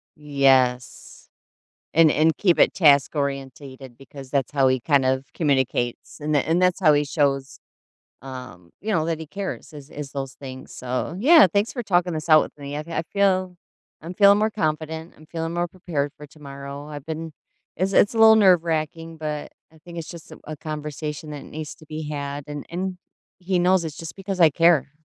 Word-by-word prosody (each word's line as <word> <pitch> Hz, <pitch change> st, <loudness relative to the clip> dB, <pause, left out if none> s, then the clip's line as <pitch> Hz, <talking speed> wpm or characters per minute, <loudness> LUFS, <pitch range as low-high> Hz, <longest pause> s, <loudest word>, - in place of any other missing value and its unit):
Yes, 135 Hz, -4 st, 0 dB, 0.6 s
and 160 Hz, -1 st, +5 dB
and 160 Hz, +1 st, +2 dB
keep 180 Hz, -4 st, +2 dB
it -, -, +5 dB
task-orientated 140 Hz, -4 st, 0 dB
because 135 Hz, 0 st, -12 dB
that's 140 Hz, -1 st, -1 dB
how 135 Hz, -2 st, +3 dB
he 130 Hz, -1 st, +1 dB
kind 140 Hz, +1 st, +2 dB
of 130 Hz, +1 st, 0 dB
communicates, 130 Hz, -5 st, -1 dB
and 150 Hz, +1 st, -1 dB
th 145 Hz, -, +2 dB
and 170 Hz, +3 st, +1 dB
that's 180 Hz, +1 st, +2 dB
how 155 Hz, -4 st, +5 dB
he 145 Hz, 0 st, +2 dB
shows, 135 Hz, -2 st, -1 dB, 0.6 s
um, 125 Hz, -10 st, -10 dB
you 215 Hz, +2 st, -3 dB
know, 160 Hz, -4 st, +1 dB
that 165 Hz, -1 st, -2 dB
he 160 Hz, -, -7 dB
cares 195 Hz, -4 st, -6 dB
is 145 Hz, -1 st, -11 dB
is 145 Hz, -2 st, -8 dB
those 135 Hz, -2 st, -5 dB
things. 130 Hz, -2 st, -10 dB
So, 130 Hz, +6 st, -4 dB
yeah, 300 Hz, -, +7 dB
thanks 205 Hz, +2 st, +1 dB
for 245 Hz, -3 st, -4 dB
talking 175 Hz, -3 st, +1 dB
this 155 Hz, +1 st, -5 dB
out 155 Hz, 0 st, +8 dB
with -, -, -11 dB
me, 145 Hz, 0 st, -7 dB
I -, -, -3 dB
I 165 Hz, 0 st, -3 dB
feel 185 Hz, -2 st, +1 dB, 0.5 s
I'm 170 Hz, +3 st, -7 dB
feeling 200 Hz, +1 st, +6 dB
more 215 Hz, +1 st, +2 dB
confident, 160 Hz, -2 st, -3 dB
I'm 155 Hz, -, -16 dB
feeling 165 Hz, +1 st, -4 dB
more 175 Hz, 0 st, -1 dB
prepared 160 Hz, -6 st, -3 dB
for 150 Hz, 0 st, -11 dB
tomorrow, 140 Hz, -1 st, -9 dB
I've 145 Hz, -2 st, -8 dB
been 160 Hz, 0 st, -5 dB, 0.5 s
it's 190 Hz, +2 st, 0 dB
it's 205 Hz, -, +4 dB
a -, -, -4 dB
little 220 Hz, 0 st, +8 dB
nerve 185 Hz, -5 st, +5 dB
racking, 165 Hz, 0 st, -3 dB
but 150 Hz, -1 st, -5 dB, 0.2 s
I -, -, -18 dB
think 170 Hz, +2 st, -12 dB
it's 165 Hz, -, -6 dB
just, 170 Hz, -2 st, -11 dB
uh, -, -, -12 dB
a 155 Hz, -1 st, -8 dB
conversation 150 Hz, 0 st, -6 dB
that 145 Hz, -, -7 dB
needs 155 Hz, -1 st, -7 dB
to 155 Hz, -, -17 dB
be 155 Hz, 0 st, -6 dB
had, 140 Hz, -1 st, -5 dB
and 145 Hz, -1 st, -7 dB
and 185 Hz, +2 st, -4 dB, 0.4 s
he 180 Hz, 0 st, -1 dB
knows 180 Hz, -1 st, +3 dB
it's 155 Hz, -, -7 dB
just 165 Hz, -1 st, -8 dB
because 195 Hz, -1 st, -5 dB
I 165 Hz, -2 st, +7 dB
care. 165 Hz, -2 st, +3 dB
155 Hz, 195 wpm, -23 LUFS, 140-175 Hz, 0.6 s, out